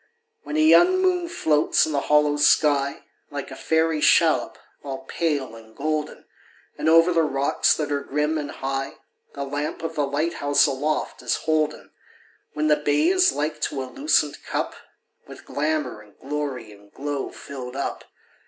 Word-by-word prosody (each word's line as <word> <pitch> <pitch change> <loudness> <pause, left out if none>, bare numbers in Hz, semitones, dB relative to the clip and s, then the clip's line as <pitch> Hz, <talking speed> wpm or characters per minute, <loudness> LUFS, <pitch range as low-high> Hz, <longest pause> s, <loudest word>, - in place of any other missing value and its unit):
When 310 - -4
a - - +3
young 350 +4 +6
moon 365 -2 +1
floats 150 - +2
in 155 - -4
the 145 - +1
hollow 150 0 +3
sky, 145 -1 +3 0.3
Like - - -6
a - - -7
fairy 160 -1 0
shallop, - - +3 0.3
all 135 -1 -6
pale 145 -8 -2
and 110 -1 -15
golden. 155 +1 -3 0.5
And - - 0
over 165 +2 +5
the 165 - +3
rocks 140 -3 +1
that 150 -2 -3
are 140 -1 0
grim 150 +3 -1
and 145 -1 -5
high. 135 0 -4 0.4
The 140 - -3
lamp 145 +3 -4
of 165 0 -3
the 145 -3 0
light 150 +5 -1
house 145 -2 +3
aloft 145 +2 -2
is - - 0
holden; 155 -1 -1 0.6
When 150 0 -1
the 150 -1 +4
bay 150 - +2
is 370 0 +4
like 150 +2 -3
to 135 - -2
a - - -5
lucent 275 - +1
cup - - -3 0.5
With - - -12
glamor 150 -6 -2
and 105 -1 -20
glory 135 -5 -4
and 100 0 -18
glow 145 -1 -4
filled 130 -2 -9
up. 140 - -4
150 Hz, 170 wpm, -23 LUFS, 140-160 Hz, 0.6 s, young